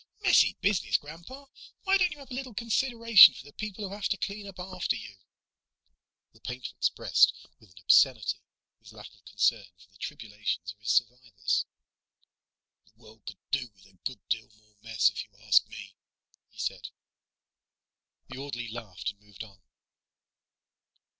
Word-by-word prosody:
"Messy - - +5
business, 200 -2 +2
Grandpa. 170 - -12 0.4
Why 390 0 +3
don't 360 -1 +3
you 300 - -8
have 275 -2 -14
a - - -5
little 255 -3 -6
consideration 230 -1 +6
for 130 - -11
the 145 - -15
people 215 -1 -6
who 190 - -8
have 205 0 -2
to 200 - 0
clean 200 +1 -5
up 195 -2 -11
after 180 -6 -2
you?" 110 -3 -10 1.2
The - - -23
painter 125 +1 -6
expressed - - +3 0.2
with 110 - -21
an 95 - -24
obscenity 125 -3 +4 0.4
his - - -16
lack - - -12
of - - -24
concern 105 -4 +1
for 90 +2 -22
the 100 - -23
tribulations 105 - -4
of 105 - -37
his 110 - -6
survivors. 120 -3 0 1.2
"The 100 - -27
world 110 -1 -18
could 100 - -7
do 130 -2 -1
with 95 - -22
a 95 - -22
good 125 -8 -6
deal 110 -2 -2
more 105 0 -29
mess, 115 -1 +2
if - - -5
you - - -21
ask - - +4
me," - - -10 0.6
he - - -25
said. - - -4 1.4
The - - -9
orderly 120 -4 -5
laughed 110 -5 -6
and 100 0 -27
moved 105 0 -11
on. 100 -3 -16
125 Hz, 165 wpm, -28 LUFS, -, 1.4 s, consideration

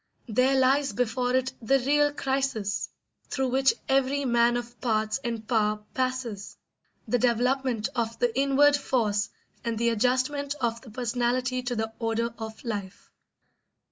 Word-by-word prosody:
There 255 +4 +3
lies 270 +2 +3
before 250 +1 0
it 260 0 0
the 270 +5 +3
real 290 +3 +3
crisis 265 -8 -1 0.4
through 265 -1 -1
which 265 +1 +3
every 275 +1 +2
man 240 -1 +3
of 240 0 -8
parts 215 -1 0
and 230 -2 -4
power 210 -3 +1
passes: 255 -6 -3 0.5
the 245 - +1
development 245 -1 +1
of 230 -2 -1
the 240 -1 0
inward 280 +2 +4
force 220 -7 0 0.3
and 230 -2 -2
the 235 +1 +2
adjustment 260 +5 0
of 235 -1 -1
the 245 - -13
personality 250 +2 -1
to 245 0 -3
the 220 0 -2
order 230 0 -1
of 220 0 -7
life. 205 -5 -6
245 Hz, 140 wpm, -27 LUFS, 225-265 Hz, 0.5 s, inward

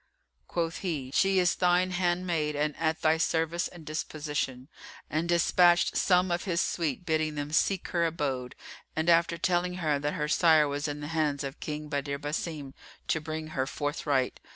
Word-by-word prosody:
Quoth 165 -1 -2
he, 150 -9 -3
"She 195 +3 +3
is 180 -1 +4
thine 180 +1 +2
handmaid 175 -4 0
and 150 0 0
at 160 0 -1
thy 160 0 +4
service 165 +1 0
and 175 -3 -13
disposition," 150 -4 -3 0.4
and 160 +3 -1
despatched 175 +1 +4
some 180 -1 +3
of 175 0 -1
his 170 -3 0
suite 165 -3 -1
bidding 155 -2 0
them 145 0 -4
seek 185 +3 +1
her 170 -1 +1
abode 135 -6 -3 0.4
and, 160 +2 0
after 170 0 +3
telling 180 +1 0
her 155 -5 0
that 145 +1 -2
her 150 -3 -1
sire 155 -1 +5
was 145 +1 -2
in 145 0 -4
the 145 - -5
hands 150 -3 0
of 135 +1 -6
King 150 0 -5
Badr 140 -1 -2
Basim, 145 -1 -4 0.4
to 160 - +1
bring 155 0 -5
her 135 -3 -2
forthright. 145 -2 -1
160 Hz, 175 wpm, -29 LUFS, 145-175 Hz, 0.4 s, sire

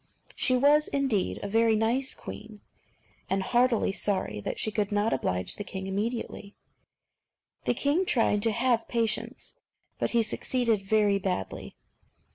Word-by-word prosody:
She 255 -1 +3
was, 295 +3 +4
indeed, 265 -9 0
a - - -2
very 225 +2 +3
nice 240 +5 0
queen, 215 -1 -10 0.7
and 195 0 0
heartily 240 -1 +2
sorry 195 - -1
that - - -4
she 215 - +1
could 210 -1 -1
not 205 +2 +1
oblige 90 -7 -2
the 205 - -4
king 190 -1 -6
immediately. 205 +1 -4 1.1
The - - +1
king 315 +7 +1
tried 225 -5 +2
to 225 - +2
have 235 0 +1
patience, 230 - -2 0.4
but - - 0
he 235 -1 +2
succeeded 230 -1 0
very 205 0 +2
badly. 180 - -4
220 Hz, 140 wpm, -28 LUFS, 200-245 Hz, 1.1 s, was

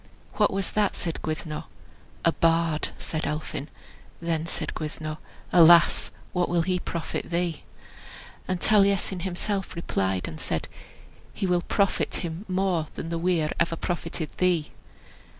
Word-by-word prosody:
"What 210 - +3
was 195 0 -1
that?" 210 -2 +2
said 165 -2 -3
Gwyddno. 155 -1 -4 0.6
"A 165 - +6
bard," 165 -1 +2
said 160 -1 -3
Elphin. 150 -1 -3 0.5
Then 165 -1 -1
said - - -3
Gwyddno, 155 0 -4 0.4
"Alas! 170 0 +7 0.2
what 180 -1 +1
will 175 -1 +2
he 180 +1 +1
profit 170 -2 -4
thee?" 170 -2 -1 0.9
And 185 -1 -1
Taliesin 200 -2 +3
himself 190 +2 -2
replied 95 - -1
and 80 - -7
said, - - -1 0.7
"He - - -1
will 180 -1 +2
profit 200 +3 +1
him 170 +3 -4
more 185 -4 +1
than 165 - -5
the 165 0 -2
weir 165 -3 +1
ever 170 0 +2
profited 165 -2 -3
thee." 175 -4 +2
170 Hz, 135 wpm, -26 LUFS, 160-185 Hz, 0.9 s, Alas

